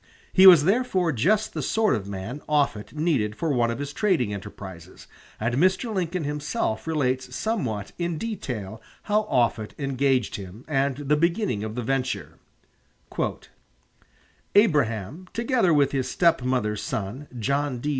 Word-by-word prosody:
He 190 0 +8
was 175 -6 +9
therefore 190 -3 +2
just 200 - +1
the - - -3
sort 220 -2 +2
of 100 -2 -2
man 100 +9 -6
Offutt 140 -8 +1
needed 140 -10 0
for 165 - -2
one 120 -2 +2
of 115 - -2
his 145 +1 -5
trading 155 - +1
enterprises, 95 -4 -9 0.3
and 115 +3 -1
Mr. 185 - +2
Lincoln 180 -3 -1
himself 145 -6 -2
relates 130 -5 -1
somewhat 125 - -2
in 170 -2 -1
detail 115 - -5 0.2
how 210 0 +1
Offutt 115 -3 +1
engaged 135 -3 0
him 100 +4 -10
and 135 -2 0
the 145 +1 +1
beginning 170 - 0
of 110 0 -5
the 125 - -3
venture: 125 - -2 2.2
"Abraham, 150 - +2
together 235 -5 +2
with 145 -3 +3
his 130 -2 -1
stepmother's 125 - +1
son, 110 +8 -4
John 140 +3 0
D. 145 +5 -3
140 Hz, 140 wpm, -25 LUFS, 110-170 Hz, 2.2 s, was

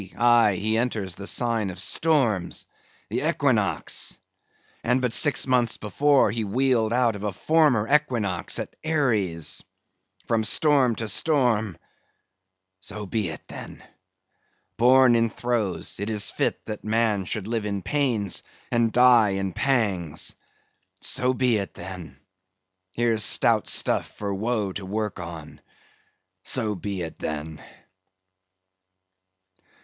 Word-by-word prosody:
aye, 120 -4 +5
he 110 +3 0
enters 110 -7 -2
the 100 +3 -7
sign 115 -4 0
of 90 - -7
storms, 110 - +1 0.4
the - - -2
equinox! - - 0 0.7
and 125 +2 +2
but 125 -3 -1
six 145 - +2
months 125 -3 +1
before 140 +3 +2
he 115 +1 -2
wheeled 115 +1 +1
out 120 -2 +2
of 100 - -7
a 105 - -1
former 130 - +2
equinox 120 - +1
at - - -5
Aries! 105 - 0 0.6
From 115 -1 +1
storm 130 +1 +3
to 110 - -3
storm! 115 - +1 1.0
So 105 +2 -7
be 100 -2 -2
it, 75 - -9
then. - - -10 0.9
Born 125 0 +5
in 115 0 +2
throes, 115 -4 -2
'tis 105 0 -2
fit - - -2
that 110 -1 -6
man 110 -3 +1
should 105 +1 -3
live 110 -2 -2
in 100 -2 -3
pains 120 -10 0 0.3
and 115 -1 +2
die 120 -5 +5
in 95 -2 -3
pangs! 105 - 0 0.7
So 125 0 +1
be 125 -3 +2
it, 100 -1 -5
then! 90 -3 -9 0.8
Here's 115 -2 +1
stout - - +2
stuff - - 0
for 100 -1 -3
woe 105 -1 -1
to 100 - -6
work 105 +1 -3
on. 85 -3 -9 0.8
So 110 -5 -2
be 100 -1 -4
it, 80 -1 -8
then." 80 0 -5
110 Hz, 125 wpm, -25 LUFS, 100-125 Hz, 1.0 s, aye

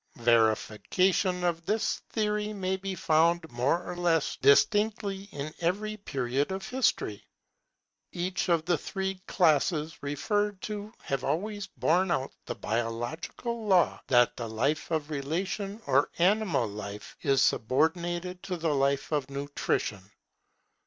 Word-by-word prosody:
Verification 120 - +2
of 170 -1 0
this 215 +1 0
theory 210 -1 -1
may 190 -2 -1
be 190 0 -4
found 165 0 +2
more 130 +9 +1
or - - -4
less 170 -3 +1
distinctly 200 - +3
in 145 0 -5
every 205 +5 0
period 140 - -2
of 190 0 -4
history. 250 - 0 0.9
Each 180 +2 -2
of 165 -2 +2
the 175 -4 +1
three 190 +2 -3
classes 160 -2 +2
referred 205 +8 -1
to 210 0 -5
have 135 -2 -2
always 200 +7 -2
borne 185 0 +1
out 135 -5 -1
the - - -3
biological 120 - -3
law 185 -3 +3
that 120 -2 +4
the 115 -2 -5
life 135 +8 0
of 155 -2 -2
relation 185 +8 -3
or 140 +2 +3
animal 180 - +2
life, 100 0 -7
is 135 -1 +3
subordinated 175 +8 0
to 190 -2 -4
the 160 -2 0
life 140 +1 +1
of 145 -3 0
nutrition. 140 -7 -2
170 Hz, 130 wpm, -29 LUFS, 140-195 Hz, 0.9 s, that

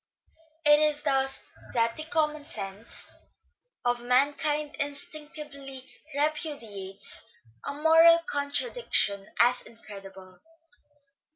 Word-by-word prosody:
It 295 0 +7
is 300 -1 +3
thus 270 0 +2 0.3
that 230 -1 +2
the 310 - -5
commonsense 300 - -2 0.8
of 245 0 +1
mankind 290 +4 +2
instinctively 285 -2 -4 0.3
repudiates 235 - -2 0.4
a - - -4
moral 325 +2 +7
contradic 290 +13 -1
tion 200 -1 +2
as 245 +1 +5
incredible. 195 -4 -12
285 Hz, 85 wpm, -28 LUFS, 230-300 Hz, 0.8 s, It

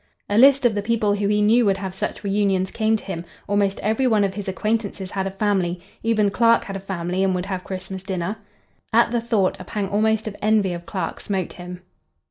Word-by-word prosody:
A 205 - -1
list 275 +1 +6
of 235 - +4
the 205 - -1
people 215 -1 +1
who 205 0 0
he 210 0 +2
knew 230 +4 +5
would 195 -1 +2
have 190 -1 -5
such 190 - -4
reunions 195 -2 +1
came 220 0 +1
to - - -12
him; 175 -4 -5 0.2
almost 200 -1 +1
every 220 +5 +1
one 215 -4 +3
of 195 -1 0
his 205 0 -6
acquaintances 205 -1 -2
had 195 -1 -2
a - - -1
family;—even 200 +2 0
Clark 230 +1 +4
had 195 - -6
a - - -3
family 185 -1 -2
and 190 -1 +2
would 180 0 -2
have 190 -2 -3
a - - -25
Christmas 190 0 -6
dinner. 185 +1 -3 0.5
At 230 +1 +4
the 240 -1 0
thought, 215 -6 +1
a - - -7
pang 200 +1 -3
almost 220 +2 +1
of 210 - -5
envy 210 -3 +2
of 170 0 -8
Clark 185 +2 -3
smote 190 -3 -3
him. 180 0 -9
200 Hz, 225 wpm, -22 LUFS, 190-215 Hz, 0.5 s, list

